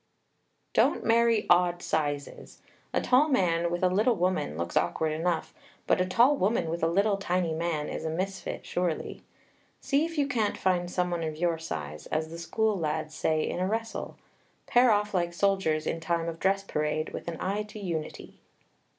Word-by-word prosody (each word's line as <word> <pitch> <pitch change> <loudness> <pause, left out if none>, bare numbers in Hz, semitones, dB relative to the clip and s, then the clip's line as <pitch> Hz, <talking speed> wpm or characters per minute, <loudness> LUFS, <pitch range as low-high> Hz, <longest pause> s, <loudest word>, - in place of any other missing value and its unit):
Don't - - +2
marry 230 -1 +3
odd 175 0 +3
sizes. 145 -2 -3 0.3
A - - +1
tall 270 +5 +4
man 170 - +2
with 175 +1 -3
a - - +6
little 215 +6 +2
woman 180 - -1
looks 85 +1 -4
awkward 155 - +1
enough; 165 +2 -1 0.3
but - - +2
a 185 - +1
tall 240 +9 +4
woman 195 - 0
with 170 - -3
a 165 - +3
little, 200 +4 +2
tiny 180 -3 0
man 160 -2 -2
is - - -5
a 160 - -2
misfit, 185 +4 -4
surely. 175 -3 -2 0.6
See 280 +2 +1
if 330 0 -4
you 285 -1 +2
can't 225 -7 0
find 180 -2 +1
someone 180 -1 -1
of 155 -1 -3
your 170 -1 0
size, 75 - -6
as 160 +1 -2
the 165 - -7
school 220 +5 0
lads 155 -2 -2
say 155 -1 0
in - - -3
a 185 - +1
wrestle. 225 +2 -3 0.5
Pair 245 +1 +5
off 210 -1 +2
like 175 -2 0
soldiers 175 -5 +1
in 165 - -2
time 170 0 -1
of 165 0 -5
dress 195 +1 +1
parade, 155 -3 -2
with - - -6
an 170 -1 -4
eye 200 +3 -1
to 210 +1 -9
unity. 170 -6 -5
175 Hz, 185 wpm, -28 LUFS, 160-205 Hz, 0.6 s, a